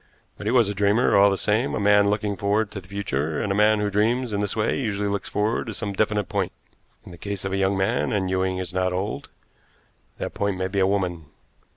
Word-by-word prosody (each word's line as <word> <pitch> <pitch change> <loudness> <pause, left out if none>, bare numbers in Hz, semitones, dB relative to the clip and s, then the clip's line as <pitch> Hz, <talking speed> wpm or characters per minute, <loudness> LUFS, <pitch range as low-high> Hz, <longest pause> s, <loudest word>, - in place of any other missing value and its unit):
But 105 - -7
he - - +2
was 120 -4 +4
a 100 - -2
dreamer, 100 +4 +2
all 100 +1 +6
the 100 - 0
same 110 +7 0
a - - -1
man 100 0 +4
looking 105 0 -1
forward 100 +2 0
to 95 - -6
the 95 - -18
future, 80 -6 -2
and 100 - -1
a - - +2
man 105 +1 +4
who 105 0 -1
dreams 115 +3 +1
in 100 - 0
this 100 -2 -2
way 110 +4 0
usually 105 -5 -1
looks 100 0 -3
forward 105 +3 -1
to 110 - -5
some 100 -2 -3
definite 105 -1 0
point. - - -1 0.5
In - - -11
the 85 - -12
case 100 -2 -4
of 95 - -2
a - - 0
young 95 0 +1
man 85 -6 0
and 95 -3 0
Ewing 95 0 0
is 90 -1 -4
not 95 0 0
old 95 +3 -3 0.9
that - - -5
point 100 -2 -1
may 95 0 -1
be 100 +1 -1
a 95 - +4
woman. 90 -5 -1
100 Hz, 245 wpm, -24 LUFS, 95-105 Hz, 0.9 s, all